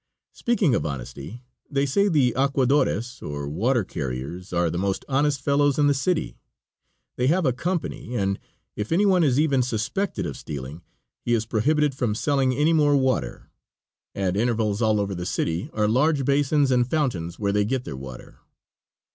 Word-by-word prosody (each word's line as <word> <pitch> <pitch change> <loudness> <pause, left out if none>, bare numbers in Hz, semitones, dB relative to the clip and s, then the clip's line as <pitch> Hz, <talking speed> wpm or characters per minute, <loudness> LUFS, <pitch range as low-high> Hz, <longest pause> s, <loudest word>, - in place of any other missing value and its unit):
Speaking 220 - +1
of - - +1
honesty 70 - -6 0.3
they 140 -1 +1
say 200 +9 +2
the 140 - +3
aquadores, 130 -3 +1
or 70 -1 -5
water 115 - +1
carriers, 75 +3 -5
are 85 -2 +1
the 85 - -2
most 95 0 -1
honest 140 +1 +1
fellows 140 0 +2
in 145 - +3
the 145 - +4
city. 160 +4 -1 0.8
They 125 - +1
have 175 +4 +2
a 130 - +2
company, 155 -4 -3
and 100 -2 0 0.4
if 105 +1 -4
any 190 +5 +3
one 185 -3 +4
is 135 -3 +3
even 140 -4 +3
suspected 125 - -2
of - - -5
stealing 70 +3 -7 0.4
he 120 - 0
is 110 -1 -1
prohibited 145 +7 +1
from 120 -5 -1
selling 135 +1 +1
any 150 +6 +2
more 145 -2 +4
water. 130 - -1 0.6
At 95 -2 -1
intervals 110 -1 0
all 110 -2 +3
over 100 -1 -1
the 90 -1 -4
city 85 0 -2
are 105 -1 +1
large 135 +5 +2
basins 140 0 +2
and 125 -1 +2
fountains 95 - -1
where 100 -2 0
they 105 0 +2
get 125 +4 -1
their 70 - -6
water. 65 -2 -10
125 Hz, 170 wpm, -24 LUFS, 100-145 Hz, 0.8 s, the